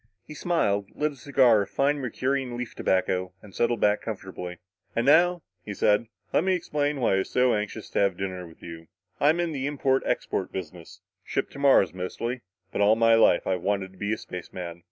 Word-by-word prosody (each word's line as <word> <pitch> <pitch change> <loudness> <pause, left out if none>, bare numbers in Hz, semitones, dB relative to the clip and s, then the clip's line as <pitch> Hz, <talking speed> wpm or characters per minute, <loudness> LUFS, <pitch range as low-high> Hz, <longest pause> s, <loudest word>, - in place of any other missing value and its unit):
He - - -10
smiled, 105 - 0
lit 150 0 0
a - - -13
cigar 130 -5 +4
of 100 - -4
fine 145 +1 +1
Mercurian 130 0 -2
leaf 125 -1 -5
tobacco 95 0 0
and 100 -2 -14
settled 120 -1 0
back 105 0 +3
comfortably. 95 -4 -6 0.4
"And 115 - +1
now," 175 +4 +4 0.2
he 105 - -6
said, 105 +3 +2 0.3
"let - - +3
me 190 0 +2
explain 150 -4 -1
why 120 - +2
I - - +3
was 95 - -3
so 125 -1 +3
anxious 105 +1 -3
to - - 0
have 100 -3 +2
dinner 95 -2 -4
with 80 - -17
you. 80 -1 -9 0.3
I'm 155 +4 +3
in 170 -1 0
the 140 -2 -2
import 135 -2 +1
export 95 - -1
business. 90 0 -8 0.2
Ship 135 - -2
to 140 - -10
Mars, 135 - +4
mostly. 115 +7 -4 0.3
But - - -2
all 105 +2 +5
my 115 0 +4
life 115 -6 +4
I've 90 -2 -1
wanted 95 0 -1
to 95 - -20
be 105 +1 -2
a 110 - 0
spaceman." 85 -1 -7
110 Hz, 205 wpm, -26 LUFS, 95-140 Hz, 0.4 s, all